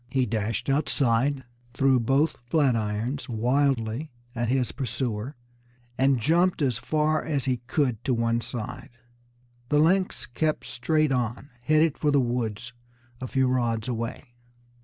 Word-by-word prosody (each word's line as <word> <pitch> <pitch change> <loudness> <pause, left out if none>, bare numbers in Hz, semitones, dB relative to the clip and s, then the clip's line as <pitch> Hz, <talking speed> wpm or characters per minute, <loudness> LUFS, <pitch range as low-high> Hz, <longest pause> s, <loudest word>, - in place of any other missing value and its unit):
He 130 0 +1
dashed 110 -1 -2
outside, 135 -1 +2 0.3
threw 135 -1 +4
both 135 +7 +2
flat 140 -3 +3
irons 115 +6 -2
wildly 125 +2 0 0.2
at 120 -1 -1
his 130 -1 +1
pursuer, 120 0 -3 0.6
and 135 0 +3
jumped 170 +6 +2
as 125 -4 0
far 155 +3 +1
as 145 -4 -1
he 130 -2 +1
could 125 -5 0
to 130 - +2
one 115 0 +1
side. 120 +2 -6 0.8
The 150 - +3
lynx 180 +5 +2
kept 155 +5 -1
straight 155 +3 0
on, 125 +2 -2
headed 155 +1 +3
for 150 - +2
the 140 -1 +4
woods 120 -2 -2 0.5
a 130 - -3
few 130 +1 +1
rods 120 -3 0
away. 120 +2 -4
130 Hz, 135 wpm, -26 LUFS, 115-145 Hz, 0.8 s, threw